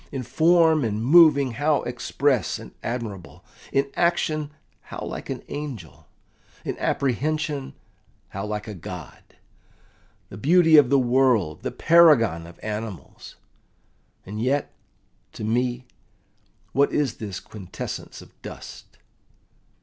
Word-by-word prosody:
In 135 -2 -4
form 160 +4 +3
and 110 0 -2
moving 145 -3 +6
how 145 +5 +1
express 125 +1 0
and - - -11
admirable! 115 -7 -6 0.3
In 140 0 0
action 155 -3 0 0.4
how - - -8
like - - -7
an - - -5
angel! 135 - -7 0.6
In - - -3
apprehension 145 +2 -1 0.5
how 100 +2 -5
like 105 0 -4
a 105 - -5
god! 90 -3 -9 1.1
The 95 - -10
beauty 165 - +5
of 140 -4 +6
the 140 - +4
world, 120 - +2
the - - -3
paragon 125 - +4
of 85 - -14
animals! 105 -6 -7 0.9
And 105 +3 -6
yet, 135 +4 0 0.6
to - - -8
me, 120 +3 -1 0.9
what 140 +1 +2
is 145 -5 0
this 100 -4 -6
quintessence 100 -5 -8
of - - -19
dust? - - -11
125 Hz, 120 wpm, -24 LUFS, 105-145 Hz, 1.1 s, moving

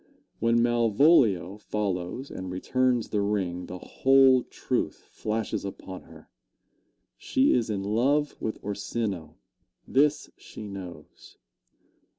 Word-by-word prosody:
When 115 +1 +3
Malvolio 115 - +3
follows 105 +4 -3
and 95 0 -6
returns 125 +6 0
the 105 - 0
ring 95 -4 -2
the 90 - -6
whole 135 +5 +4
truth - - -3
flashes 110 0 -3
upon 95 -1 -8
her. 80 -1 -15 0.9
She 265 +2 +2
is 115 -2 +1
in 100 -2 -2
love 135 +8 +1
with 110 - -3
Orsino 100 -5 -4 0.5
this 145 +2 +2
she - - -10
knows. 95 -3 -10
105 Hz, 110 wpm, -27 LUFS, 95-125 Hz, 0.9 s, whole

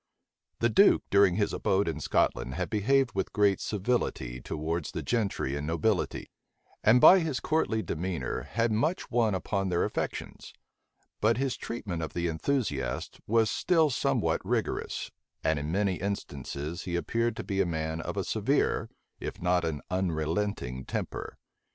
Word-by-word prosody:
The 115 - +4
duke, 200 - +5
during 100 -3 +5
his 105 0 0
abode 95 0 +1
in 80 - -2
Scotland, 60 +2 0
had - - -3
behaved 130 +4 +2
with 95 -1 -2
great 100 -2 +3
civility 95 - -1
towards 80 +4 -3
the - - -3
gentry 105 - -1
and 75 +1 -4
nobility; 85 +5 0 0.5
and 115 +3 +6
by 190 +9 +9
his 160 -6 -1
courtly 120 -9 0
demeanor 90 +1 -3
had 115 +1 +1
much 150 - 0
won 115 -4 +2
upon 95 0 -1
their 85 -1 +1
affections: - - -4 0.7
but 110 +2 +3
his 135 -1 0
treatment 100 -8 -5
of 80 - -4
the 85 0 -1
enthusiasts 80 - -2
was 115 0 +3
still 160 -4 +3
somewhat - - +1
rigorous; - - -2 0.3
and 80 -2 +2
in 75 +2 -3
many 95 0 +1
instances 80 -5 -4
he 85 - -2
appeared 115 +7 0
to - - -5
be 100 -2 0
a - - +2
man 80 0 -2
of 90 +5 -5
a 100 - +1
severe, 115 +9 +1 0.3
if - - -6
not 90 0 +2
an 80 -3 -2
unrelenting 85 -5 -1
temper. - - -5
95 Hz, 155 wpm, -29 LUFS, 80-115 Hz, 0.7 s, by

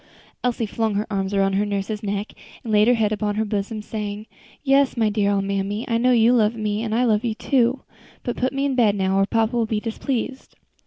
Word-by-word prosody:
Elsie 245 -2 0
flung 220 0 -1
her 210 +2 0
arms 195 -1 -1
around 195 -1 +1
her 200 +2 +2
nurse's 205 +1 -3
neck, 205 0 -3 0.3
and 225 - -3
laid 210 +1 +5
her 245 - +5
head 215 -2 +1
upon 210 -1 -1
her 220 +1 0
bosom, 210 +1 -3
saying, 210 -1 -5 0.4
"Yes, 275 -2 +3
my 220 -2 +2
dear 205 -1 +1
old 200 -1 +1
mammy, 200 +3 -2
I 230 -1 +1
know 250 +2 +3
you 235 0 +5
love 225 -2 +3
me, 215 -1 -2
and 225 -1 -2
I 245 - +2
love 215 -1 +2
you, 230 -3 -1
too. 255 +1 +1 0.4
But 240 - -3
put 255 +1 0
me 275 0 -1
in 280 - 0
bed 225 -5 +3
now, 190 0 +1
or 195 - +2
papa 225 +1 +1
will 230 -2 +1
be 220 -1 -1
displeased." 245 +3 -4
215 Hz, 230 wpm, -22 LUFS, 205-235 Hz, 0.4 s, laid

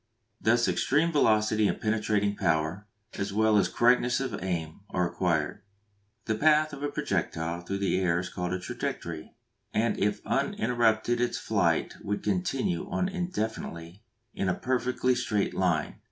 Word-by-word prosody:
Thus 120 +1 +3
extreme 160 +5 +2
velocity 110 -6 +3
and - - -2
penetrating 105 -2 +1
power, 85 +2 0 0.3
as 100 0 -2
well 110 +1 +3
as 105 - +3
correctness 120 0 +3
of 130 -8 -3
aim, 85 -3 -3
are 90 -1 +1
acquired. 85 -1 -1 0.6
The 110 - 0
path 155 +5 +3
of 140 - -7
a 145 - -1
projectile 85 -7 -2
through 95 +3 -3
the 100 -1 +1
air 90 -2 +2
is 90 - -2
called 90 0 -4
its 90 0 -3
trajectory, 80 -2 -5 0.4
and 115 +2 +1
if 105 +1 0
uninterrupted 120 0 +1
its 120 -1 0
flight 90 -7 0
would 105 +1 -2
continue 95 -1 -1
on 185 - 0
indefinitely 110 - -4 0.3
in 95 - -1
a 90 - +1
perfectly 125 0 0
straight 115 -5 0
line. 85 -5 0
105 Hz, 150 wpm, -28 LUFS, 90-120 Hz, 0.6 s, Thus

